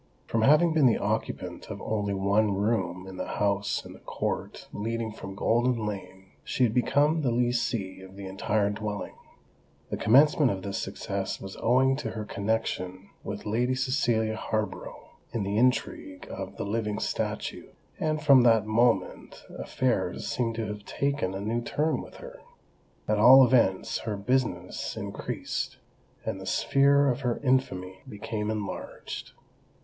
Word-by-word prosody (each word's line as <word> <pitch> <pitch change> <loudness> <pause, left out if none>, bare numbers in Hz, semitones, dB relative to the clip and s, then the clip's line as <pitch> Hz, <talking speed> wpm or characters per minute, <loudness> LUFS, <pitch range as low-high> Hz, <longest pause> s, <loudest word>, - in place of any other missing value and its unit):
From 115 - 0
having 155 +7 +5
been 155 -4 +5
the 115 - +3
occupant - - -3
of - - -6
only 100 -2 -1
one 100 +2 +2
room 95 -3 -1
in 95 -1 -9
the - - -4
house 100 -1 0
in - - -9
the - - -14
court - - -4
leading 115 +1 -3
from 100 -2 -8
Golden 120 +2 +1
Lane, 95 -2 -7
she 130 - 0
had 115 -3 +3
become 145 +6 +3
the 135 - +1
lessee 120 -5 0
of 95 0 -12
the 100 0 -8
entire 100 +2 0
dwelling. 105 -1 -4 0.8
The - - -1
commencement 145 +5 +5
of 95 -1 -4
this 100 -1 -3
success 100 -1 -3
was 95 0 -8
owing 130 +3 +3
to 150 - -4
her 110 -1 -5
connexion 100 -3 -2
with 100 0 -6
Lady 120 +4 +1
Cecilia 120 -5 +1
Harborough 110 0 -4 0.2
in 115 - -1
the 100 +1 -2
intrigue 120 -6 0
of 95 0 -6
the - - -3
"living 105 0 -1
statue;" - - -3 0.3
and 155 -1 0
from 140 -3 +7
that 115 -3 +4
moment 110 -3 0
affairs 100 -9 -1
seemed 115 -2 -1
to 115 -1 -2
have 105 -1 -6
taken 140 -7 -1
a - - -3
new 115 +3 -1
turn 150 +6 0
with - - -12
her. - - -11 0.7
At 105 -1 +1
all 130 +4 +9
events 115 -7 +2
her 110 -3 -3
"business" 100 -5 -1
increased; - - -4 0.5
and - - -3
the - - -8
sphere 140 +1 +4
of 125 -1 +1
her 120 -3 0
infamy 95 -9 0
became 105 +1 -4
enlarged. 105 -2 -5
110 Hz, 155 wpm, -28 LUFS, 100-125 Hz, 0.8 s, all